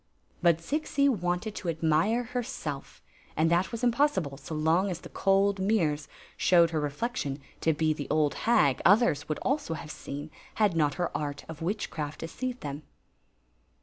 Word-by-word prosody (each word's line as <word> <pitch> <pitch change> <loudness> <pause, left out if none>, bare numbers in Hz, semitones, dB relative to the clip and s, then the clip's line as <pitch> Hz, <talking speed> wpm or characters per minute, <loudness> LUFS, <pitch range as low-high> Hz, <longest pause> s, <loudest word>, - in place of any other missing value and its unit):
But 170 -2 +4
Zixi 280 - +1
wanted 180 -3 0
to 175 - -3
admire 165 +9 +2
herself; 240 - -5 0.3
and 160 +2 +3
that 175 +5 +2
was 230 0 -5
imfK)ssible 235 - +1
so 160 - -6
long 160 +5 +2
the 175 0 -7
cold 195 0 +2
mirrors 175 -7 +1 0.3
showed 170 -2 +4
her 160 - 0
reflection 145 - -2 0.2
to 160 - +2
be 155 0 +1
the 145 -2 -6 0.3
hag 145 - +3
others 195 -8 +4
would 155 - -1
also 275 - 0
have 155 -1 -7
seal 145 +1 -7 0.3
had 210 -5 +2
not 150 -3 +2
her 175 -2 -1
artb 145 -1 -4
^ 160 0 -9
witchcraft 165 -5 -3
deceived 250 +9 -4
tbem. 145 +1 -5
170 Hz, 150 wpm, -28 LUFS, 155-220 Hz, 0.3 s, But